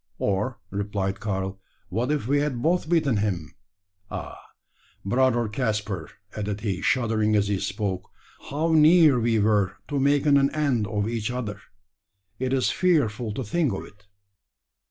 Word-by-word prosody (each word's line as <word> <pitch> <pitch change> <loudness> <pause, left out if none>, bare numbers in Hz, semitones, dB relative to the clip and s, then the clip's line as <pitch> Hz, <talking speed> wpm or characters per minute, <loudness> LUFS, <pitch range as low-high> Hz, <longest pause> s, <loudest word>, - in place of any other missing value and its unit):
"Or," 105 +6 -1
replied 100 -1 -2
Karl, 95 -2 -3 0.3
"what 115 +8 -1
if 150 -6 -1
we 145 +2 +3
had 140 -5 -2
both 170 -1 +1
beaten 155 -9 +2
him? 95 -7 -2 0.6
Ah! - - -6 0.7
brother 120 +2 +2
Caspar," 105 - -2 0.3
added 105 -1 -3
he, 100 -5 -2
shuddering 110 -4 +1
as 100 -1 +2
he 100 -2 0
spoke, 95 -1 -3 0.4
"how 155 +4 0
near 155 -3 +6
we 115 -1 +2
were 105 -2 +2
to 145 - -1
making 140 +1 +4
an 140 0 +3
end 135 -8 +1
of 105 -1 -1
each 115 -1 -2
other! 110 -5 -4 0.8
It's 130 0 +1
fearful 125 - +1
to 130 - -3
think 145 +3 0
of 95 - -5
it!" 105 +1 -19
110 Hz, 145 wpm, -25 LUFS, 100-140 Hz, 0.8 s, near